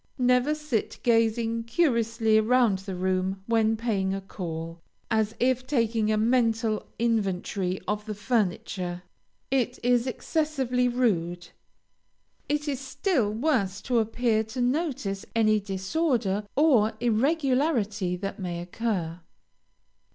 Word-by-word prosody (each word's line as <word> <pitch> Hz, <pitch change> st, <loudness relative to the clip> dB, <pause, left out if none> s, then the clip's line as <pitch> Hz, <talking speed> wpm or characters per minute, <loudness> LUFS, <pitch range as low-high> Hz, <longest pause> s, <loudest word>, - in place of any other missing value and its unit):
Never 250 Hz, +3 st, +3 dB
sit 300 Hz, -8 st, -2 dB
gazing 230 Hz, 0 st, +2 dB
curiously 230 Hz, -5 st, +2 dB
around 225 Hz, -3 st, +3 dB
the 190 Hz, -1 st, -6 dB
room 185 Hz, +1 st, -1 dB
when 225 Hz, -1 st, +2 dB
paying 200 Hz, -4 st, 0 dB
a -, -, -3 dB
call, 165 Hz, -3 st, -6 dB, 0.3 s
as 220 Hz, 0 st, +1 dB
if 255 Hz, 0 st, +1 dB
taking 230 Hz, -5 st, +1 dB
a 215 Hz, -, +2 dB
mental 225 Hz, -1 st, +1 dB
inventory 195 Hz, -4 st, -1 dB
of 210 Hz, +1 st, -2 dB
the 215 Hz, -, -4 dB
furniture. 185 Hz, -5 st, -1 dB, 0.5 s
It 255 Hz, -2 st, +1 dB
is 245 Hz, 0 st, +3 dB
excessively 260 Hz, -3 st, 0 dB
rude. 175 Hz, -8 st, 0 dB, 1.0 s
It 295 Hz, +1 st, 0 dB
is 275 Hz, -3 st, -1 dB
still 270 Hz, -, 0 dB
worse 220 Hz, -6 st, 0 dB
to 245 Hz, -3 st, +2 dB
appear 225 Hz, 0 st, +1 dB
to 220 Hz, +4 st, -7 dB
notice 245 Hz, -, -1 dB
any 215 Hz, -1 st, +4 dB
disorder 205 Hz, -, -1 dB
or 260 Hz, -8 st, +4 dB
irregularity 245 Hz, -, +1 dB
that 195 Hz, +3 st, -5 dB
may 175 Hz, -2 st, -3 dB
occur. 175 Hz, -2 st, -3 dB
225 Hz, 115 wpm, -27 LUFS, 195-250 Hz, 1.0 s, any